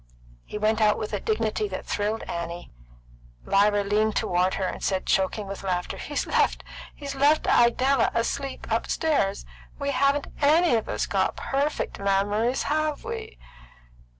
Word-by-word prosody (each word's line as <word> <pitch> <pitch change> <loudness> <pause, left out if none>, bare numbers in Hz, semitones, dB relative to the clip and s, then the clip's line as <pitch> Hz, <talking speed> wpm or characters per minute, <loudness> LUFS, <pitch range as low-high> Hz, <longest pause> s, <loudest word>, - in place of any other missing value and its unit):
He - - -6
went 215 +1 +1
out 210 -1 +4
with 215 - -5
a 205 - 0
dignity 215 0 -1
that 190 -2 -6
thrilled 210 +2 -2
Annie. 170 0 -6 0.7
Lyra 205 +1 +3
leaned 210 +2 +1
toward 180 +1 +1
her 195 - -2
and - - -5
said, 190 -1 0
choking 195 +2 +1
with 195 0 -7
laughter, 180 -2 -2
"He's 290 - -3
left - - +1 0.8
Idella 255 +2 +4
asleep 270 +4 -2
upstairs. 280 - 0 0.3
We 280 -1 -2
haven't 280 +1 +2 0.2
any 315 +3 +4
of 220 - -2
us - - -1
got - - 0
perfect 285 +2 -2
memories, 205 +5 +1
have 305 0 -1
we?" 450 -1 -6
215 Hz, 140 wpm, -25 LUFS, 200-280 Hz, 0.8 s, out